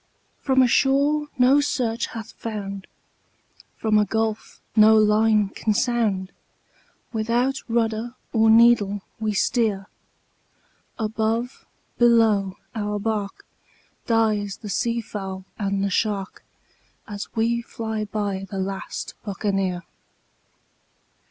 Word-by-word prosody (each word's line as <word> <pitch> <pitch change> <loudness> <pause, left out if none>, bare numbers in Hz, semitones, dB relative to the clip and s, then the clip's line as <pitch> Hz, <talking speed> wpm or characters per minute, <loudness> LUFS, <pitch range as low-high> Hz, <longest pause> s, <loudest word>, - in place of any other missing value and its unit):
"From 265 -2 +3
a - - +4
shore 285 +4 +2
no 260 +3 +5
search 240 -5 -1
hath 225 -2 -8
found, 200 -3 -6 0.9
from 215 -1 +2
a 210 - +3
gulf 220 0 -2 0.2
no 220 0 +7
line 215 -1 +3
can 215 +1 -1
sound, 215 -6 0 0.8
Without 240 +4 0
rudder 230 0 -1 0.2
or 225 -1 +4
needle 220 -3 +5 0.2
we 215 -1 -1
steer; 205 -2 +1 1.1
Above, 225 +2 -2 0.3
below, 220 -5 +4 0.2
our 210 -2 -2
bark, 205 -1 -3 0.6
dies 215 -3 +1
the 210 - -6
sea 235 +3 0
fowl 195 -3 -6
and 195 -1 -1
the 200 - 0
shark, 200 -1 -2 0.6
As 205 -2 -6
we 235 +1 +1
fly 220 -2 -4
by 200 -2 -3
the 195 - -5
last 190 0 -4
Buccaneer. 195 -3 -2
220 Hz, 105 wpm, -23 LUFS, 200-235 Hz, 1.1 s, no